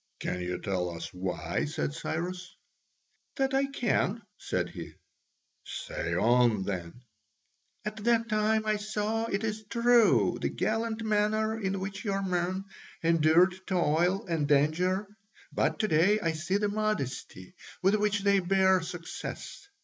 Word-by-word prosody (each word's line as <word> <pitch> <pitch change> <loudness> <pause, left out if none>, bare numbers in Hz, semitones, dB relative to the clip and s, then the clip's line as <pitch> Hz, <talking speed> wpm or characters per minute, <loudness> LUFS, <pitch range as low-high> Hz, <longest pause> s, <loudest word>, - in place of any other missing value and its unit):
"Can 90 - -3
you 90 0 -2
tell 90 -3 -1
us 85 -1 -7
why?" 90 0 -2
said 70 0 -3
Cyrus. 180 - -4 0.8
"That 270 -1 0
I 270 +1 +3
can," 235 -5 0
said - - -2
he. - - -8 0.7
"Say 85 0 -4
on, 115 0 +3
then." 95 +4 -5 0.8
"At 210 +1 -4
that 230 -1 +3
time, 215 0 +1
I 215 0 +1
saw, 215 +2 -2
it 200 -1 -2
is 215 0 -2
true, 230 - +4
the - - 0
gallant 225 0 -1
manner 215 +1 +1
in 195 -2 -1
which 195 +1 -5
your 195 -2 -1
men 185 +1 -1 0.4
endured 165 +2 +4
toil 180 +2 +1
and 165 -5 -1
danger, 160 +7 +2 0.5
but - - +1
to 215 - +1
day 185 +6 +4
I 165 -5 0
see 165 +5 -1
the 210 0 0
modesty 205 - -3 0.3
with 195 +2 +4
which 210 -1 +1
they 200 0 +4
bear 190 0 +3
success. 175 - -7
190 Hz, 140 wpm, -29 LUFS, 155-215 Hz, 0.8 s, true